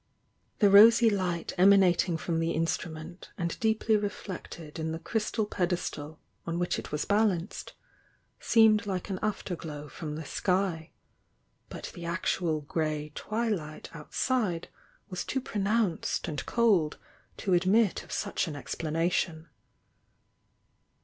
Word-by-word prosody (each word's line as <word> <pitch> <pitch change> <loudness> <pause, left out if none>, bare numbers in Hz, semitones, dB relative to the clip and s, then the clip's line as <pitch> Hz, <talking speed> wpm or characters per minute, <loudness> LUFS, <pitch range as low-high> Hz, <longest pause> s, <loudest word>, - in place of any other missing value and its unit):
The 205 -3 +4
rosy 225 +3 +8
light 180 -4 -1
emanating 185 -3 +5
from 165 0 -2
the 165 0 0
instrument 165 +1 -3
and 170 -2 -2
deeply 220 0 +2
reflected 185 -6 -5
in 160 0 -2
the - - -3
crystal 215 +4 -1
pedestal 175 -5 -3 0.3
on 170 0 -1
which 175 0 0
it - - -9
was 150 0 -1
balanced, 205 -3 0 0.7
seemed 220 -2 +4
like 190 0 -3
an 185 - -3
after 210 -3 -2
glow 150 -3 -7
from 150 +1 -6
the 155 0 -6
sky, 180 -4 -1 0.4
— - - -43
but - - -7
the 175 - -9
actual 170 -2 -1
grey 150 0 -2
twilight 205 -9 -3
outside 180 - -1 0.4
was 180 -1 -3
too 265 - -2
pronounced 210 -7 0
and 150 -3 -4
cold 200 -10 +2 0.4
to 190 - 0
admit 190 +4 +3
of - - -14
such - - -1
an 155 - -5
explana 165 +4 -2
tion. 165 -2 -2
175 Hz, 130 wpm, -29 LUFS, 160-205 Hz, 0.7 s, rosy